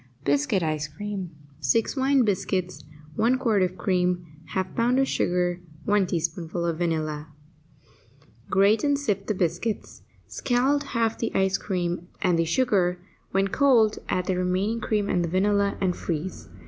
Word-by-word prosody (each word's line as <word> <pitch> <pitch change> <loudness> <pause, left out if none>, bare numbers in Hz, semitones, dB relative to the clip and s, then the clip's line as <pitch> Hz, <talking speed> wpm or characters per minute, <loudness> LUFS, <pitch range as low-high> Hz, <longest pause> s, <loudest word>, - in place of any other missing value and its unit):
BISCUIT 145 +6 +1
ICE 155 -1 -1
CREAM 195 +4 -5 0.3
6 185 - +1
wine 270 -1 +3
biscuits 185 -5 -1 0.3
1 235 +4 +3
quart 225 -6 +2
of 185 0 0
cream 180 -1 0 0.3
1/2 190 -1 -2
pound 240 +2 +2
of 270 - +3
sugar 180 -4 0 0.3
1 205 -2 +3
teaspoonful 170 0 -2
of 165 -1 -1
vanilla 155 -3 -1 1.2
Grate 200 +3 +4
and 285 -1 +3
sift 205 -8 -2
the 215 - 0
biscuits. 180 +5 -2 0.2
Scald 270 +3 +1
half 225 -1 +1
the 230 - 0 0.3
cream 175 -3 -2
and 180 -4 +2
the 165 - +2
sugar; 180 -2 +2 0.3
when 195 +1 +1
cold, 235 -4 +4
add 180 - 0
the 185 - 0
remaining 185 +5 0
cream 210 -2 0
and 175 -3 +1
the 170 - -2
vanilla, 200 +2 +2
and 185 -2 +1
freeze. 170 +2 -4
190 Hz, 150 wpm, -25 LUFS, 175-215 Hz, 1.2 s, Grate